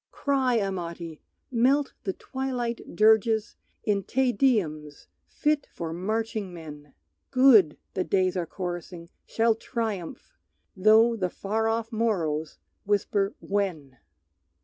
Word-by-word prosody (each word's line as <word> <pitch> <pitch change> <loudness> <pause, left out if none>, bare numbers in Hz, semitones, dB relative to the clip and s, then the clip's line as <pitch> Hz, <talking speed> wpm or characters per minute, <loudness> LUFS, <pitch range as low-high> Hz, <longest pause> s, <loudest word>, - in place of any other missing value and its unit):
Cry, 265 -3 +1
Amati! 170 -5 -4 0.3
Melt 265 +4 +2
the 190 - -1
twilight 250 -2 -4
dirges 220 0 +3 0.3
In 205 -2 +1
"Te 260 +6 +1
Deums" 160 - 0 0.2
fit 300 -1 0
for 165 -1 -5
marching 215 +2 -2
men! 150 -4 -11 0.3
"Good," 250 - +6 0.2
the 185 - 0
days 185 -1 +1
are 175 -2 -2
chorusing, 175 -1 -6 0.2
"shall 225 0 +2
triumph;" 220 - -5 0.4
Though 220 +4 +5
the 185 -5 -1
far 220 +5 -2
off 225 +1 -1
morrows 165 -9 -1 0.3
whisper, 200 0 0
"When?" 165 -11 -3
205 Hz, 110 wpm, -26 LUFS, 175-230 Hz, 0.4 s, Good